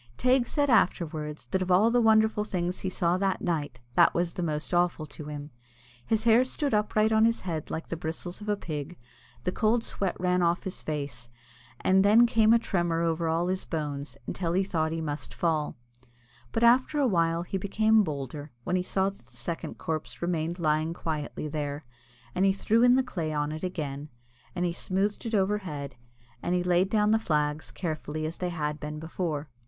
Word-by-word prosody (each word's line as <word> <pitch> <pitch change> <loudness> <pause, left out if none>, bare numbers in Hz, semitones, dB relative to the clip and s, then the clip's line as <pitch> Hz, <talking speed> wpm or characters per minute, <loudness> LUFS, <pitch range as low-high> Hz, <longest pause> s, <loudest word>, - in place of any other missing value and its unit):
Teig 255 0 +3
said 290 -1 +1
afterwards, 155 - +1
that 190 - +1
of 185 - -2
all 200 +6 +5
the 245 0 +4
wonderful 220 -1 +4
things 180 -3 -2
he 190 - -2
saw 175 -1 +1
that 195 -1 +1
night, 150 -8 -2
that - - +5
was 170 0 0
the - - -4
most 155 0 -2
awful 175 -3 +2
to 150 +1 -9
him. 145 0 -7 0.5
His 220 - 0
hair 235 +1 +6
stood 275 +1 -1
upright 215 +1 +2
on 220 0 +4
his 230 +1 +2
head 165 -5 -4
like 160 - -4
the - - -4
bristles 165 +4 -5
of 210 - -6
a 205 - +1
pig, 155 -1 -5 0.5
the 180 - 0
cold 225 +4 +2
sweat 195 -5 -2
ran 180 0 +2
off 170 +1 +2
his 190 -2 -5
face, 140 -6 -4 0.5
and 190 +1 +4
then 215 +4 +7
came 225 -2 +4
a 235 - +7
tremour 175 -7 0
over 165 0 0
all 165 +2 +1
his 185 0 -1
bones, 145 -3 -4
until 170 -2 -2
he 190 +2 +3
thought 160 -5 0
that 160 - -3
he 165 - -3
must 150 -1 -5
fall. 155 -3 0 0.7
But 225 - 0
after 255 +5 +4
a 285 - +3
while 170 -6 +2
he 190 +2 -3
became 215 +3 +3
bolder, 145 -2 -5
when 180 - -1
he 185 - +2
saw 190 +1 0
that 195 -12 -20
the 125 -1 -17
second 165 +8 -5
corpse 155 -1 -4
remained 170 -1 -1
lying 155 0 0
quietly 155 -2 -4
there, 145 -1 -4 0.5
and 185 - +1
he 195 0 +4
threw 220 +3 +2
in 245 0 +6
the 265 - +3
clay 170 -11 -3
on 150 0 -1
it 155 +2 -6
again, 150 -5 -4 0.5
and 180 0 0
he 170 - 0
smoothed 200 +6 -1
it 225 - -1
overhead 190 -9 -1 0.5
and 175 - 0
he 180 - +1
laid 180 +1 +2
down 210 0 +3
the 220 - +4
flags 150 -5 0
carefully 155 -3 -4
as 160 +2 -5
they 180 - -1
had 150 -3 -3
been 150 0 -5
before. 160 -2 -3
175 Hz, 200 wpm, -28 LUFS, 155-205 Hz, 0.7 s, then